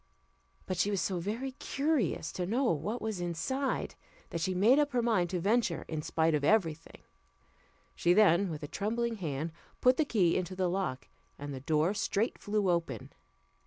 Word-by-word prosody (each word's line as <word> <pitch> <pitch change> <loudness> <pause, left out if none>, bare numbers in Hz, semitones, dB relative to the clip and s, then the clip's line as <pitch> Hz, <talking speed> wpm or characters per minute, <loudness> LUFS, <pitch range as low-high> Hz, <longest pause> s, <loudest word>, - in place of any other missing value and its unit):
But 185 - -3
she 200 - +2
was 200 -2 0
so 185 -1 -1
very 225 +9 -3
curious 275 - -1
to 180 -1 -3
know 240 +7 +1
what 185 +10 -3
was 215 -5 -3
inside, 255 +11 -2 0.4
that 170 - -3
she 185 +2 0
made 225 +10 +5
up 290 -2 +1
her 245 - +2
mind 190 -7 +2
to 180 - -1
venture 205 -1 +1
in 155 -2 -3
spite 160 +1 +1
of 150 -1 +1
every 170 -1 +3
thing. 165 +2 -17 0.9
She 175 - +2
then, 195 -1 +5
with 155 -2 -6
a - - -4
trembling 230 +6 -2
hand, 160 -3 -3 0.3
put 255 0 +4
the 315 - +2
key 190 -11 +2
into 185 0 -2
the 185 -1 +1
lock, 180 -9 -2 0.3
and 145 0 -6
the 130 - -5
door 155 +6 +1
straight 210 +2 -1
flew 205 -3 +1
open. 165 -10 -3
185 Hz, 185 wpm, -31 LUFS, 165-225 Hz, 0.9 s, made